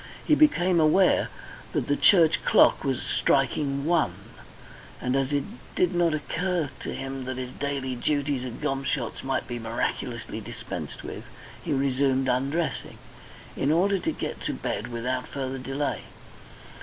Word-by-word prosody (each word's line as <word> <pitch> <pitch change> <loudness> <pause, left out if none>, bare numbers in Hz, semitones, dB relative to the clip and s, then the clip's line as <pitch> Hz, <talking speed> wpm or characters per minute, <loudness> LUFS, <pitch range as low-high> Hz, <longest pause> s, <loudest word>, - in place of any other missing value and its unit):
He 310 - +4
became 185 - +4
aware 165 +4 +4 0.5
that - - 0
the 145 - +2
church 170 -3 +5
clock - - +5
was 135 -3 -1
striking 140 +1 +1
one, 160 - +2 0.8
and 125 +1 -1
as 135 0 +1
it 145 -1 +1 0.3
did 180 -1 +2
not 170 -2 +2
occur 165 -1 -1
to - - -5
him 135 -1 -5
that 130 0 -4
his 125 -1 -4
daily 140 -2 -2
duties 140 +1 0
at 125 -2 -6
Gomshott's 135 -3 -2
might 135 0 -1
be 120 0 -4
miraculously 115 0 -3
dispensed - - -7
with, - - -7 0.4
he - - -4
resumed 135 -1 +2
undressing, 135 +6 -1 0.6
in 140 - +1
order 190 +4 +3
to - - -1
get - - -5
to - - -1
bed 105 +4 -3
without 125 +2 -2
further 135 -1 -4
delay. 135 +3 -2
140 Hz, 145 wpm, -26 LUFS, 130-155 Hz, 0.8 s, church